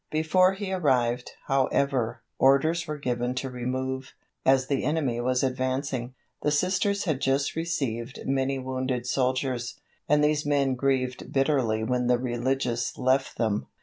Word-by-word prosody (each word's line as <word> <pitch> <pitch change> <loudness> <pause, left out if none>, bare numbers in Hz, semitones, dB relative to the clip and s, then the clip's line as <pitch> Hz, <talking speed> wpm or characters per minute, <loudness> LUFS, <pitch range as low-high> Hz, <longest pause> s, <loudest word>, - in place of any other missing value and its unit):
Before 185 +4 +3
he 195 -1 -4
arrived, 125 -8 +1
however, 130 -3 +1 0.2
orders 155 +5 +3
were 150 0 -3
given 125 -2 -2
to 130 0 -3
remove, 130 +1 -3 0.3
as 130 -1 +4
the 135 0 -1
enemy 140 -6 0
was 125 +1 +1
advancing. 130 -1 -2 0.3
The - - +1
Sisters 185 +6 +1
had 155 -8 -1
just 135 +1 +1
received 135 -7 -3
many 135 0 0
wounded 130 -1 -2
soldiers, 125 -1 -1 0.3
and 150 0 +4
these 150 0 +2
men 140 -2 +2
grieved 130 -1 -1
bitterly 135 -6 +1
when 125 +2 0
the 125 0 +4
religious 120 -1 -1
left 130 +2 +1
them. 110 -3 0
130 Hz, 140 wpm, -27 LUFS, 125-145 Hz, 0.3 s, as